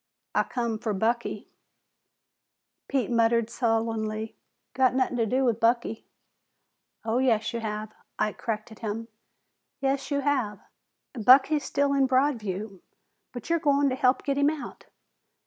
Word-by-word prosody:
"I - - +3
come 235 -3 -2
fer 215 -1 -2
Bucky." 230 +4 -1 1.4
Pete 260 -4 -1
muttered 230 0 +2
sullenly, 225 -2 -1 0.4
"Got 255 -1 +3
nothin' 260 -1 +1
to 230 -2 +1
do 260 +4 +1
with 230 -2 +1
Bucky." 230 -1 0 1.0
"Oh, 230 +2 +1
yes, 235 -5 +1
you 235 - -2
have," 215 -1 -5 0.2
Ike 215 - -1
corrected 220 -1 -4
him. 225 +1 -4 0.7
"Yes, 275 0 -1
you 285 -1 0
have. 255 -8 0 0.5
Bucky's 265 +5 +5
still 280 0 +1
in 275 -1 +3
Broadview, 220 -8 -1 0.5
but 245 - -8
you're 335 - +3
goin' 285 -2 +3
to 255 - -1
help 255 0 +2
get 280 0 -1
him 285 +1 +4
out. 310 -2 -7
235 Hz, 135 wpm, -27 LUFS, 220-270 Hz, 1.4 s, Bucky's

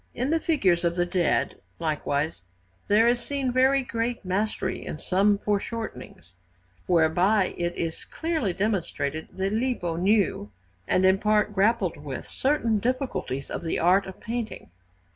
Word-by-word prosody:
In 255 +4 -1
the 325 - +3
figures 190 - +2
of 170 0 +1
the 175 -1 +1
dead, 175 -2 0 0.2
likewise, 150 - -1 0.5
there 215 +3 +5
is 240 0 +3
seen 275 -2 -2
very 265 +2 +3
great 235 -2 -3
mastery 190 0 -1
in - - -5
some 200 +5 +2
foreshortenings, 205 - -4 0.5
whereby 180 +4 +3
it 175 0 -2
is 165 -1 -3
clearly 320 - -2
demonstrated 170 -6 -2
that 195 +2 -1
Lippo 220 -8 -1
knew, 190 - +1 0.4
and 185 - +3
in 190 +1 +4
part 210 0 +2
grappled 200 -3 +2
with, 145 -2 -7
certain 235 -6 +1
difficulties 245 - -2
of - - -3
the 165 -1 -2
art 185 +4 +3
of 190 - -9
painting. 230 - -5
200 Hz, 145 wpm, -26 LUFS, 170-230 Hz, 0.5 s, there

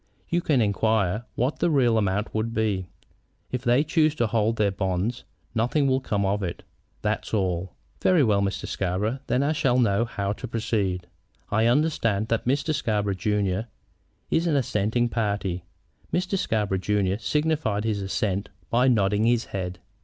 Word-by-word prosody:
You 175 +1 +1
can 145 -7 +2
inquire 105 0 +1
what 130 +5 0
the 175 - +2
real 130 -7 +3
amount 105 0 0
would 115 +2 -2
be. 100 -5 0 0.6
If 125 - -2
they 125 +3 +4
choose 155 -1 +2
to 120 - +1
hold 115 0 +1
to 110 - +2
their 100 - +2
bonds, 95 +6 -2 0.3
nothing 125 +6 +1
will 130 -1 +3
come 105 -6 -1
of 100 +2 0
it; 90 -3 -4 0.4
that's - - -1
all." 95 -2 -1 0.3
"Very 180 -5 +4
well, 105 -4 +3
Mr. 100 0 -2
Scarborough. 100 +7 -1
Then 130 - +2
I 145 - +2
shall 135 -5 +2
know 115 -2 +3
how 100 -3 -2
to 125 - -7
proceed. 105 -6 -1 0.5
I 110 +2 +3
understand 120 -6 +1
that 115 - 0
Mr. 145 +5 +1
Scarborough, 105 -8 0
junior, 100 +2 0 0.6
is 165 +2 +2
an 160 - +2
assenting 120 -2 +1
party?" 100 -6 -2 0.5
Mr. 180 +2 0
Scarborough, 105 - 0
junior, 100 0 0
signified 150 -5 0
his 110 -3 -1
assent 95 +1 -1 0.2
by 125 +2 +4
nodding 105 -3 +3
his 120 0 +2
head. 90 -2 -3
110 Hz, 165 wpm, -25 LUFS, 100-125 Hz, 0.6 s, they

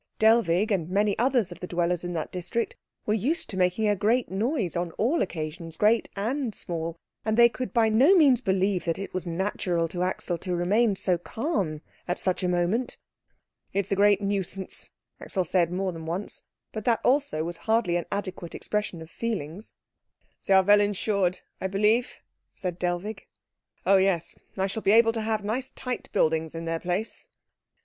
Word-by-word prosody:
Dellwig 220 -2 +3
and 175 -5 0
many 205 +2 +2
others 245 -6 +2
of 175 - -9
the 180 - -6
dwellers 175 0 0
in 175 0 -4
that 160 -2 -3
district 185 +6 -3 0.3
were 210 - +1
used 280 - 0
to - - -5
making 185 +4 +2
a 205 - +3
great 225 +5 +1
noise 215 - -1
on 175 0 -1
all 275 +10 +1
occasions 165 -1 -4
great 220 +2 +3
and 235 +3 -2
small, 165 -1 -4 0.3
and 220 0 0
they 235 0 +8
could 250 +2 -5
by 230 -3 +3
no 255 - +5
means 275 -8 +5
believe 190 -3 +1
that 165 -1 0
it 195 - -6
was 185 -1 -3
natural 175 -1 -1
to 175 +2 -4
Axel 180 -1 -1
to 180 -2 -2
remain 200 +5 +2
so 180 -2 0
calm 190 - -2 0.3
at 175 - -1
such 185 -1 0
a 180 - 0
moment. 180 +8 0 0.8
"It 200 0 +1
is - - -8
a - - +3
great 205 0 +4
nuisance," 195 -1 -2 0.3
Axel 190 - -1
said 175 -1 +1
more 185 +1 -1
than 165 -1 -8
once; 180 +5 -3 0.3
but 215 - -5
that 230 -2 +2
also 270 - +2
was 170 +1 -5
hardly 220 -6 +1
an 175 - -1
adequate 185 -4 -4
expression 210 -6 -3
of 160 - -15
feelings. 205 -4 -4 0.7
"They 195 - +5
are 190 - +6
well 205 +2 +6
insured, 200 -2 0 0.2
I 190 - 0
believe?" 210 +5 +2 0.4
said 180 -2 -4
Dellwig. 180 +4 -3 0.6
"Oh 195 - +6
yes. 190 -3 +1 0.2
I 190 - +1
shall 200 +3 -3
be 200 - +3
able 225 0 +6
to 225 - -2
have 215 -1 -1
nice 250 +5 -1
tight 250 -1 -5
buildings 160 0 +1
in 165 0 -5
their 165 0 -1
place." 180 +6 -3
195 Hz, 185 wpm, -26 LUFS, 175-220 Hz, 0.8 s, they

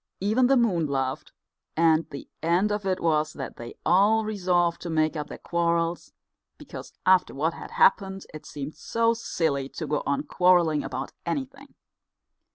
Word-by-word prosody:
Even 220 +6 +2
the 270 +1 +4
moon 185 -10 +2
laughed, 135 -1 -2 0.5
and 165 -1 +3
the 140 - -8
end 175 +6 +2
of 205 -1 -2
it 185 -1 0
was 155 -2 +1
that 135 - -7
they 120 0 -9
all 205 +6 +4
resolved 180 -5 0
to 175 - -5
make 155 0 +1
up 150 -1 -4
their - - -8
quarrels, 170 0 -1 0.5
because - - -10
after 185 -4 +4
what 160 +4 0
had - - -9
happened 195 -1 +2
it 155 - -9
seemed 145 +1 -6
so 230 0 0
silly 155 -11 -2
to 160 - -6
go 150 0 -1
on 140 +1 0
quarrelling 175 -4 +3
about - - -5
anything. 275 0 -5
170 Hz, 165 wpm, -26 LUFS, 155-200 Hz, 0.5 s, the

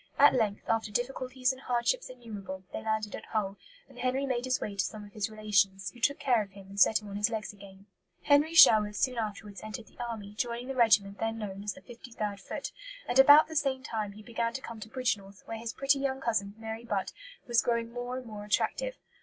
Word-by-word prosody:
At 290 +1 +7
length, 220 -5 0
after 225 -1 +1
difficulties 255 +2 -1
and 260 0 -9
hardships 250 - 0
innumerable, 210 -7 -8
they - - -4
landed 220 -1 -1
at - - -9
Hull; 205 -3 -2 0.3
and - - -15
Henry 260 +2 0
made 250 -2 -1
his 255 0 +1
way 205 - -4
to 195 - +1
some 215 -1 -6
of 205 - -15
his 210 0 -2
relations, 195 -3 +1
who 240 - -16
took 280 +5 +2
care 245 -4 +2
of 195 -2 -8
him 195 -1 -13
and 200 +1 -6
set 215 +2 +5
him - - -9
on 200 0 -5
his 210 +2 +2
legs 220 -2 -4
again. 195 -1 -14 0.4
Henry 295 +3 +4
Sherwood 210 -8 +8
soon 250 +2 0
afterwards 210 -2 -5
entered 215 +1 -7
the - - -23
army, 215 -4 -6
joining 240 +3 -3
the 270 - -3
regiment 210 -5 +4
then 225 0 -1
known 200 -2 -6
as 205 -1 -2
the - - -14
53rd 230 -4 -6
Foot; - - -6 0.4
and 245 - +2
about 290 +3 +9
the 320 - -8
same 270 -3 0
time 215 -4 -3
he 215 +1 -12
began 230 0 -2
to 265 - -4
come 230 -3 -8
to 215 - -9
Bridgnorth, 210 -6 -3
where 225 -1 -5
his 230 0 -4
pretty 275 +2 +2
young 270 -1 -1
cousin, 215 -5 -1
Mary 225 +1 -6
Butt, 205 -5 -2 0.3
was 240 -1 +3
growing 235 -1 -1
more 245 +1 -4
and 255 - -7
more 210 -2 -8
attractive. - - 0
225 Hz, 230 wpm, -30 LUFS, 205-255 Hz, 0.4 s, about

